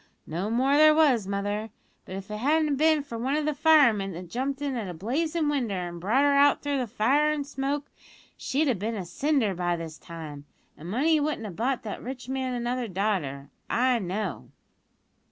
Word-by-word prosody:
"No 175 Hz, +6 st, -3 dB
more 260 Hz, +5 st, +2 dB
there 310 Hz, 0 st, +7 dB
was, 265 Hz, -10 st, +3 dB
mother; 205 Hz, +2 st, -2 dB, 0.4 s
but 185 Hz, -, -7 dB
if 195 Hz, +2 st, -7 dB
it 210 Hz, -, -3 dB
hadn't 295 Hz, +4 st, +2 dB
bin 310 Hz, 0 st, +3 dB
for 235 Hz, -5 st, -7 dB
one 265 Hz, +4 st, 0 dB
o' 305 Hz, -, 0 dB
the 305 Hz, 0 st, 0 dB
firemen 275 Hz, -, +4 dB
that 175 Hz, 0 st, -9 dB
jumped 270 Hz, +3 st, -2 dB
in 285 Hz, -2 st, -2 dB
at 220 Hz, -6 st, -3 dB
a 175 Hz, -, -6 dB
blazin' 305 Hz, -, -1 dB
winder 255 Hz, -9 st, 0 dB
an' 175 Hz, -1 st, -4 dB
brought 220 Hz, +11 st, +2 dB
her 285 Hz, 0 st, +4 dB
out 280 Hz, 0 st, +4 dB
through 285 Hz, -3 st, 0 dB
fire 265 Hz, +7 st, +2 dB
an' 300 Hz, -1 st, -1 dB
smoke, 280 Hz, +1 st, -3 dB, 0.5 s
she'd 295 Hz, +4 st, 0 dB
have 240 Hz, -8 st, +1 dB
bin 225 Hz, +3 st, -2 dB
a 190 Hz, -4 st, -4 dB
cinder 270 Hz, -, 0 dB
by 175 Hz, -1 st, -1 dB
this 165 Hz, -2 st, -7 dB
time, 155 Hz, -4 st, -9 dB, 0.3 s
an' 160 Hz, -, -11 dB
money 300 Hz, -, +2 dB
wouldn't 290 Hz, -6 st, -2 dB
have 195 Hz, -5 st, -7 dB
bought 255 Hz, +4 st, -1 dB
the 210 Hz, -3 st, -6 dB
rich 250 Hz, 0 st, -7 dB
man 260 Hz, -1 st, -2 dB
another 245 Hz, 0 st, -2 dB
daughter, 180 Hz, -9 st, -2 dB, 0.2 s
I 250 Hz, 0 st, +2 dB
know." 190 Hz, -3 st, -4 dB
245 Hz, 195 wpm, -27 LUFS, 195-285 Hz, 0.5 s, there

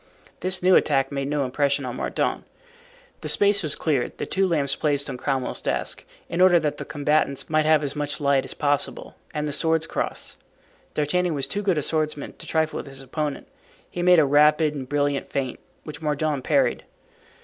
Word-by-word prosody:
This 185 Hz, 0 st, 0 dB
new 185 Hz, 0 st, +6 dB
attack 135 Hz, -2 st, +3 dB
made 140 Hz, -1 st, -2 dB
no 145 Hz, -1 st, 0 dB
impression 140 Hz, +1 st, 0 dB
on 125 Hz, 0 st, -5 dB
Mordaunt. -, -, -1 dB, 0.8 s
The -, -, -5 dB
space 200 Hz, 0 st, +3 dB
was 150 Hz, -2 st, -2 dB
cleared, 145 Hz, -6 st, -1 dB
the -, -, -3 dB
two 195 Hz, 0 st, +1 dB
lamps 145 Hz, -5 st, +1 dB
placed 145 Hz, -2 st, 0 dB
on -, -, -5 dB
Cromwell's 130 Hz, 0 st, -2 dB
desk, -, -, -2 dB, 0.2 s
in 170 Hz, -, -1 dB
order 180 Hz, -2 st, +7 dB
that 150 Hz, -2 st, -2 dB
the -, -, -6 dB
combatants 145 Hz, -1 st, 0 dB
might 155 Hz, 0 st, +3 dB
have 155 Hz, -1 st, +4 dB
as 140 Hz, 0 st, -2 dB
much 145 Hz, 0 st, -2 dB
light 140 Hz, -2 st, +2 dB
as -, -, -5 dB
possible; 145 Hz, -1 st, -1 dB, 0.2 s
and 150 Hz, 0 st, -2 dB
the 150 Hz, -, -2 dB
swords 160 Hz, +2 st, +1 dB
crossed. -, -, -4 dB, 0.6 s
D'Artagnan 170 Hz, +3 st, +1 dB
was 140 Hz, -, -1 dB
too 205 Hz, -, -3 dB
good 190 Hz, -5 st, +1 dB
a 150 Hz, -, 0 dB
swordsman 155 Hz, -2 st, -1 dB
to -, -, -10 dB
trifle 160 Hz, -1 st, 0 dB
with -, -, -6 dB
his 135 Hz, -1 st, -7 dB
opponent. 145 Hz, +1 st, -4 dB, 0.4 s
He 175 Hz, -, -4 dB
made 180 Hz, 0 st, +6 dB
a 155 Hz, -, +6 dB
rapid 150 Hz, +2 st, +4 dB
and 135 Hz, -3 st, -6 dB
brilliant 145 Hz, -1 st, 0 dB
feint 130 Hz, -3 st, -3 dB, 0.2 s
which 155 Hz, 0 st, -9 dB
Mordaunt 150 Hz, -2 st, -1 dB
parried. -, -, +2 dB
150 Hz, 195 wpm, -24 LUFS, 140-160 Hz, 0.8 s, order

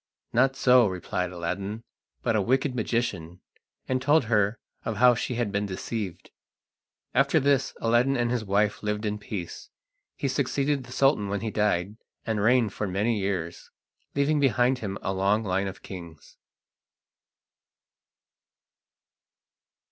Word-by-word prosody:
"Not 135 Hz, +3 st, +3 dB
so," 125 Hz, -3 st, +5 dB
replied 90 Hz, -1 st, -3 dB
Aladdin, 100 Hz, +5 st, -4 dB, 0.4 s
"but -, -, +1 dB
a 105 Hz, -, +3 dB
wicked 130 Hz, +5 st, +1 dB
magician," 105 Hz, -8 st, -2 dB, 0.5 s
and 130 Hz, 0 st, 0 dB
told 145 Hz, +3 st, +4 dB
her 105 Hz, -1 st, +1 dB, 0.3 s
of 115 Hz, -2 st, -3 dB
how 125 Hz, +2 st, +6 dB
she 120 Hz, +1 st, -3 dB
had 115 Hz, -3 st, -1 dB
been 100 Hz, 0 st, -1 dB
deceived. 95 Hz, -1 st, -5 dB, 0.8 s
After 140 Hz, +4 st, +3 dB
this 140 Hz, -1 st, +1 dB
Aladdin 120 Hz, +4 st, +3 dB
and 120 Hz, 0 st, 0 dB
his 120 Hz, -3 st, -1 dB
wife 105 Hz, +1 st, +1 dB
lived 105 Hz, 0 st, -2 dB
in 105 Hz, 0 st, -2 dB
peace. 100 Hz, -4 st, -7 dB, 0.5 s
He 140 Hz, -, -2 dB
succeeded 140 Hz, 0 st, 0 dB
the 125 Hz, -, -13 dB
Sultan 135 Hz, -7 st, +2 dB
when 100 Hz, 0 st, -2 dB
he 110 Hz, -1 st, -3 dB
died, 105 Hz, -1 st, 0 dB, 0.3 s
and 110 Hz, -3 st, -1 dB
reigned 115 Hz, -2 st, +3 dB
for 105 Hz, -, -3 dB
many 105 Hz, +4 st, 0 dB
years, 90 Hz, -4 st, -3 dB, 0.5 s
leaving 145 Hz, +2 st, +2 dB
behind 130 Hz, -2 st, +2 dB
him 100 Hz, -4 st, -4 dB
a 95 Hz, -, -1 dB
long 100 Hz, +3 st, +1 dB
line 95 Hz, 0 st, 0 dB
of 95 Hz, 0 st, -8 dB
kings. 85 Hz, -5 st, -10 dB
110 Hz, 140 wpm, -26 LUFS, 100-125 Hz, 0.8 s, how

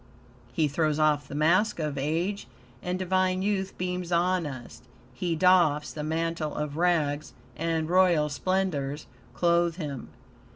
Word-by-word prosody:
He 150 Hz, +4 st, +1 dB
throws 150 Hz, +1 st, 0 dB
off 150 Hz, -2 st, +2 dB
the 140 Hz, -, -7 dB
mask 175 Hz, +8 st, +2 dB
of 150 Hz, -3 st, -2 dB
age, 165 Hz, +8 st, -2 dB, 0.3 s
and 180 Hz, +1 st, -2 dB
divine 185 Hz, 0 st, +1 dB
youth 195 Hz, -2 st, -1 dB
beams 180 Hz, -1 st, -3 dB
on 175 Hz, -1 st, +1 dB
us. 130 Hz, -4 st, -9 dB, 0.3 s
He 165 Hz, +7 st, -2 dB
doffs 160 Hz, -4 st, +3 dB
the 150 Hz, -, -5 dB
mantle 160 Hz, 0 st, -2 dB
of 150 Hz, -1 st, -3 dB
rags, 155 Hz, -4 st, 0 dB, 0.2 s
and 165 Hz, -1 st, -1 dB
royal 175 Hz, -3 st, +4 dB
splendors 150 Hz, -2 st, -2 dB, 0.3 s
clothe 170 Hz, -1 st, +2 dB
him. 145 Hz, -7 st, -6 dB
165 Hz, 135 wpm, -27 LUFS, 150-180 Hz, 0.3 s, royal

